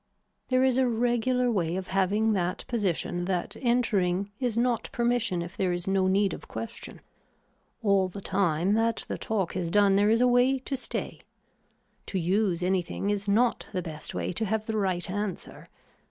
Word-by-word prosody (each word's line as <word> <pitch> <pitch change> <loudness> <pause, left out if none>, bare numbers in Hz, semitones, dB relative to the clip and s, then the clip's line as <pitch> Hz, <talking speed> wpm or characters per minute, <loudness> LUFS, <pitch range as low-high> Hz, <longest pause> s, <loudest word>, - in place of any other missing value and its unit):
There 255 0 +3
is 260 -1 +3
a 260 - +3
regular 245 +1 +1
way 175 -5 0
of 185 0 -4
having 200 +4 +2
that 180 -1 -1
position 185 -6 -1
that 180 -2 -2
entering 200 -6 +1
is 245 -4 -1
not 240 -1 +1
permission 235 -7 0
if 175 +2 -9
there 185 -2 0
is 175 0 -2
no 190 -1 +2
need 195 +1 +2
of - - -9
question. 230 0 -6 0.8
All 200 -3 +3
the 185 +2 -8
time 190 -1 +1
that 225 +1 +1
the - - -4
talk 200 -6 -2
is 175 -3 -2
done 200 +1 +4
there 205 +1 +4
is 225 +1 +4
a 250 - +4
way 250 +2 +4
to 265 +1 -4
stay. 260 - -4 0.9
To 195 - -2
use 180 0 +1
anything 190 +2 0
is 205 0 -2
not 230 +4 +2
the 180 -2 -2
best 155 -2 -7
way - - -2
to 220 +5 -2
have 215 +1 -1
the 220 - -3
right 190 -4 0
answer. 205 -1 -5
200 Hz, 180 wpm, -27 LUFS, 185-230 Hz, 0.9 s, done